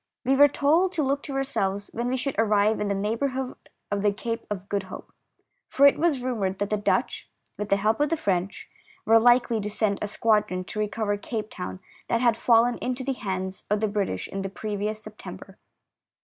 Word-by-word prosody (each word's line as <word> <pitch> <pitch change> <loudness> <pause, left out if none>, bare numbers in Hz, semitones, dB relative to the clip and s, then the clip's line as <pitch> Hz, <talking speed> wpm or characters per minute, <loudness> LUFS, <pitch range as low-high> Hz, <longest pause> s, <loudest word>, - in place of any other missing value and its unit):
We 265 +2 +3
were 285 +1 +8
told 320 +7 +2
to 315 - 0
look 280 +1 0
to 275 - -6
our 270 - +1
selves 200 -6 -2
when 235 +2 -2
we 260 - 0
should 270 +1 -2
arrive 215 -1 +3
in 210 - -1
the 200 - 0
neigh 210 +3 -1
bourhood 265 -1 -2 0.4
of 205 -1 0
the 205 0 +3
Cape 230 +3 -5
of 195 -2 -5
Good 200 -1 -1
Hope, - - -10 0.6
for 280 - +4
it 280 - +6
was 300 -6 +1
rumoured 205 -7 -1
that 205 +1 -2
the - - +3
Dutch, 205 - -1 0.3
with 210 0 -5
the 200 - +4
help 215 +4 +1
of 295 - +2
the 330 - 0
French, 195 - -2 0.4
were 225 +1 +6
likely 240 -1 +4
to 210 - -3
send 210 -1 0
a 210 - -1
squadron 210 -4 +1
to 215 - -6
recover 210 0 -1
Cape 215 +1 -5
Town, 185 +1 -6 0.3
that 230 - +1
had 235 -2 +3
fallen 235 +1 +3
into 255 +1 -3
the 270 +1 -1
hands 190 -5 -4
of 210 0 +2
the 215 - +1
British 200 - -2
in 195 - -5
the 195 - -3
previous 210 +1 -4
September. 215 0 -10
215 Hz, 215 wpm, -26 LUFS, 200-255 Hz, 0.6 s, were